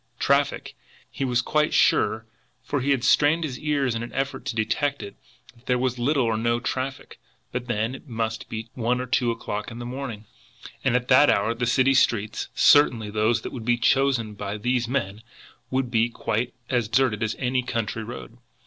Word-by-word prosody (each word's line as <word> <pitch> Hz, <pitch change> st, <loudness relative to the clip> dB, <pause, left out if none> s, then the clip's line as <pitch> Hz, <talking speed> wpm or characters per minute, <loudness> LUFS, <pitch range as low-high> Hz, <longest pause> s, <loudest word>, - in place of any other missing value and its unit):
Traffic? -, -, +1 dB, 0.4 s
He -, -, -4 dB
was 125 Hz, -2 st, +1 dB
quite 150 Hz, 0 st, +1 dB
sure, 110 Hz, +1 st, +3 dB, 0.4 s
for 145 Hz, -2 st, -2 dB
he 135 Hz, -, -1 dB
had 135 Hz, -4 st, +2 dB
strained 150 Hz, +5 st, +4 dB
his 130 Hz, -5 st, -4 dB
ears 145 Hz, -5 st, 0 dB
in 115 Hz, -, -3 dB
an 120 Hz, -, -6 dB
effort 135 Hz, 0 st, -3 dB
to -, -, -3 dB
detect 115 Hz, +5 st, -1 dB
it, 100 Hz, -, -9 dB, 0.4 s
that 120 Hz, +2 st, -24 dB
there 125 Hz, -, +2 dB
was 125 Hz, 0 st, -1 dB
little 135 Hz, +2 st, +2 dB
or 115 Hz, -1 st, 0 dB
no 115 Hz, +1 st, +1 dB
traffic; 130 Hz, +2 st, -4 dB, 0.3 s
but 125 Hz, 0 st, -4 dB
then, 115 Hz, 0 st, -1 dB
it 135 Hz, -, -11 dB
must 115 Hz, -2 st, -3 dB
be 110 Hz, 0 st, -5 dB
one 125 Hz, +1 st, 0 dB
or 125 Hz, -, -3 dB
two 125 Hz, -1 st, +1 dB
o'clock 105 Hz, -2 st, -4 dB
in 115 Hz, -, -9 dB
the 120 Hz, -, -6 dB
morning, 120 Hz, -4 st, -6 dB, 0.6 s
and -, -, +2 dB
at 125 Hz, 0 st, 0 dB
that 135 Hz, +3 st, +6 dB
hour 105 Hz, +3 st, +2 dB
the 125 Hz, +1 st, -2 dB
city 130 Hz, +2 st, +3 dB
streets, 110 Hz, -5 st, +1 dB
certainly 120 Hz, -7 st, +4 dB
those 110 Hz, +2 st, +1 dB
that -, -, -6 dB
would 120 Hz, -, -6 dB
be 120 Hz, +1 st, +2 dB
chosen 120 Hz, -2 st, +2 dB
by 100 Hz, 0 st, -5 dB
these 125 Hz, +2 st, 0 dB
men, 110 Hz, -5 st, -2 dB, 0.5 s
would 130 Hz, -2 st, -1 dB
be 115 Hz, 0 st, +2 dB
quite 120 Hz, +1 st, -2 dB
as 120 Hz, -4 st, 0 dB
deserted 120 Hz, -2 st, +1 dB
as 110 Hz, -1 st, -1 dB
any 130 Hz, 0 st, 0 dB
country 115 Hz, -3 st, -3 dB
road! 120 Hz, +1 st, -9 dB
120 Hz, 195 wpm, -24 LUFS, 115-130 Hz, 0.6 s, that